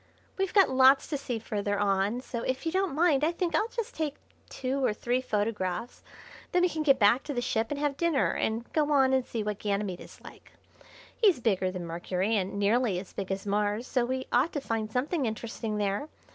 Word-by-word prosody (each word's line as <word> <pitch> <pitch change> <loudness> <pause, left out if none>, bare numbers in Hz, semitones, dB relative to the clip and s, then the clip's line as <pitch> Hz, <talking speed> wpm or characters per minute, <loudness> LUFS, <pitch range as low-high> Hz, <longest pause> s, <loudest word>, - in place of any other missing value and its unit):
"We've 385 -1 -1
got 390 -8 +5
lots 265 +1 +6
to 300 - -1
see 250 -4 -3
further 205 -2 -2
on, 200 +3 +1
so 235 -2 -5
if 260 +4 -2
you 325 - 0
don't 380 -4 0
mind 305 -3 +3
I 320 - +3
think 345 -1 -2
I'll 420 +8 +2
just 470 0 -5
take 300 -3 -2 0.3
two 265 +1 -2
or 215 - +1
three 245 +3 0
photographs, 210 -2 -2 0.5
then 360 0 +3
we 360 - +4
can 315 -1 -3
get 275 -3 +4
back 225 +5 +4
to 290 - -4
the - - 0
ship 225 -2 0
and 290 - -3
have 290 -1 -1
dinner 335 -5 +2
and 225 +2 -1
go 300 -1 +1
on 265 -2 +4
and 260 -1 +3
see 230 -3 -4
what 210 -1 -3
Ganymede 200 -3 -2
is - - -13
like. - - -14 0.6
He's 400 - +4
bigger 195 -6 +1
than 185 -1 -5
Mercury, 180 +5 -1
and 195 -1 -1
nearly 210 0 +2
as 185 +1 -7
big 195 -1 -4
as 195 +1 -3
Mars, 205 +3 0
so 255 -1 0
we 260 +2 -2
ought 260 +7 +3
to 290 - -1
find 225 -4 -3
something 270 +3 0
interesting 220 0 -4
there. 205 +8 -1
245 Hz, 215 wpm, -28 LUFS, 205-290 Hz, 0.6 s, lots